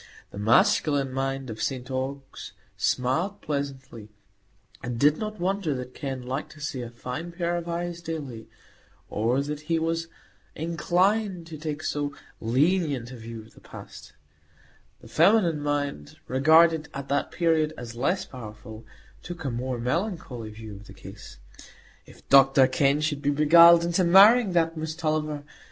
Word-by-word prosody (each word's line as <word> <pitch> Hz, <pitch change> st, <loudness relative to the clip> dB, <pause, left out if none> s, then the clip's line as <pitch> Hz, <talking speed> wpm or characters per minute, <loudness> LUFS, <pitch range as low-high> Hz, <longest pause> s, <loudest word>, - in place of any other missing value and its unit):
The 100 Hz, -, -8 dB
masculine 135 Hz, +5 st, +3 dB
mind 135 Hz, -1 st, -3 dB
of 110 Hz, 0 st, -7 dB
St 130 Hz, +1 st, -3 dB
Ogg's 135 Hz, +1 st, -5 dB, 0.2 s
smiled 160 Hz, +11 st, 0 dB
pleasantly, 135 Hz, -7 st, -5 dB, 0.7 s
and 120 Hz, -1 st, -4 dB
did 150 Hz, +3 st, +4 dB
not 215 Hz, -1 st, -5 dB
wonder 185 Hz, -4 st, -1 dB
that 125 Hz, 0 st, -7 dB
Kenn 135 Hz, -2 st, -5 dB
liked 130 Hz, +4 st, -5 dB
to 155 Hz, -, -16 dB
see 145 Hz, -4 st, -4 dB
a 120 Hz, -, -6 dB
fine 125 Hz, +8 st, -6 dB
pair 170 Hz, 0 st, -2 dB
of 170 Hz, 0 st, -4 dB
eyes 170 Hz, 0 st, -4 dB
daily, 145 Hz, -9 st, -6 dB, 0.6 s
or 120 Hz, +6 st, +1 dB
that 150 Hz, +1 st, -5 dB
he 165 Hz, -, +2 dB
was 165 Hz, +1 st, -1 dB, 0.5 s
inclined 180 Hz, +3 st, 0 dB
to 165 Hz, -1 st, -9 dB
take 155 Hz, 0 st, -5 dB
so 145 Hz, -1 st, -2 dB, 0.2 s
lenient 135 Hz, +1 st, 0 dB
a -, -, -8 dB
view 115 Hz, -1 st, -8 dB
of 110 Hz, -, -19 dB
the -, -, -18 dB
past; -, -, -12 dB, 0.9 s
the -, -, -13 dB
feminine 180 Hz, -8 st, +3 dB
mind, 145 Hz, -, -3 dB
regarded 160 Hz, +4 st, +4 dB
at 140 Hz, 0 st, -6 dB
that 140 Hz, 0 st, 0 dB
period 160 Hz, -3 st, +1 dB
as 120 Hz, -1 st, -8 dB
less 175 Hz, +11 st, -1 dB
powerful, 110 Hz, -2 st, -10 dB, 0.4 s
took 175 Hz, -3 st, -8 dB
a 135 Hz, -, -1 dB
more 125 Hz, +1 st, -3 dB
melancholy 125 Hz, -, -3 dB
view 110 Hz, -1 st, -10 dB
of 105 Hz, -, -15 dB
the -, -, -13 dB
case. -, -, -12 dB, 0.7 s
If -, -, -18 dB
Dr 135 Hz, -1 st, +6 dB
Kenn 140 Hz, +2 st, +2 dB
should 150 Hz, -2 st, -1 dB
be 145 Hz, -, 0 dB
beguiled 170 Hz, +3 st, +7 dB
into 175 Hz, +2 st, +1 dB
marrying 200 Hz, +4 st, +6 dB
that 165 Hz, -1 st, +1 dB
Miss 155 Hz, 0 st, -4 dB
Tulliver! 155 Hz, -3 st, -2 dB
145 Hz, 155 wpm, -26 LUFS, 130-170 Hz, 0.9 s, beguiled